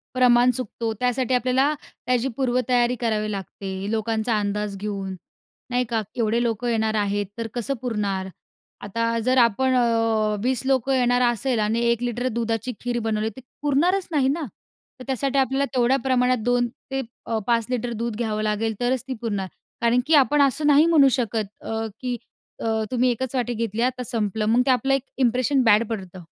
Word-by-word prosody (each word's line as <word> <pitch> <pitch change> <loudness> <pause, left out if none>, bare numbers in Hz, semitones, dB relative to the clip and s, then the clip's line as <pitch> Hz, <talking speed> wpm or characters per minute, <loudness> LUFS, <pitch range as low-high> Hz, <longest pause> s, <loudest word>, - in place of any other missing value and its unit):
प्रमाण 245 -1 +5
चुकतो 230 -2 -3
त्यासाठी 250 0 +1
आपल्याला 255 +4 +2
त्याची 250 +1 -2
पूर्वतयारी 250 -1 +1
करावी 215 -3 0
लागते, 195 0 -5
लोकांचा 220 0 0
अंदाज 205 0 -2
घेऊन, 195 -2 -4 0.6
नाही 250 0 +1
का. 225 -2 0
एवढे 230 0 +1
लोकं 235 0 -1
येणार 220 -2 +1
आहेत, 205 0 0
तर 230 - -2
कसं 245 +3 -1
पुरणार? 200 -6 -2 0.5
आता 230 +3 -1
जर 255 +1 +3
आपण 250 +3 +3
अ, 225 -3 +2
20 255 -1 0
लोकं 270 0 +2
येणार 245 -1 +3
असेल 240 0 +1
आणि 220 +2 +1
1 235 0 0
लिटर 245 +1 -1
दुधाची 230 0 -2
खीर 245 0 -2
बनवली, 220 -1 -1
ती - - -8 0.2
पुरणारच 350 +7 +2
नाही 280 -4 +2
ना. 300 +3 -1 0.6
तर - - -7
त्यासाठी 275 +1 0
आपल्याला 270 +1 +2
तेवढ्या 250 +1 +3
प्रमाणात 255 -1 +2
2 245 0 +2 0.2
ते 270 0 -1 0.3
अ, 225 -1 -1
5 230 -2 +2
लिटर 245 -1 -2
दूध 230 -1 -3
घ्यावं 215 -2 -2
लागेल 215 +1 0
तरच 250 +1 +1
ती 260 - -2
पुरणार. 200 -5 -2 0.3
कारण 235 +1 +3
की 320 - +3
आपण 290 0 +5
असं 280 +2 +1
नाही 295 +2 +6
म्हणू 300 -5 +6
शकत 225 -3 -1 0.2
अ, 225 0 -2
की 250 -1 -2 0.5
अ, - - -2 0.2
"तुम्ही 255 0 +2
1च 250 +2 -3
वाटी 245 -1 -1
घेतली. 225 -1 -2
आता 255 0 0
संपलं." 215 -2 -1
मग 230 +3 +4
ते - - +3
आपलं 265 +2 +2
एक 270 - 0 0.2
इंप्रेशन 255 +2 +2
बॅड 220 0 +5
पडतं. 190 -4 -5
240 Hz, 175 wpm, -23 LUFS, 220-255 Hz, 0.6 s, नाही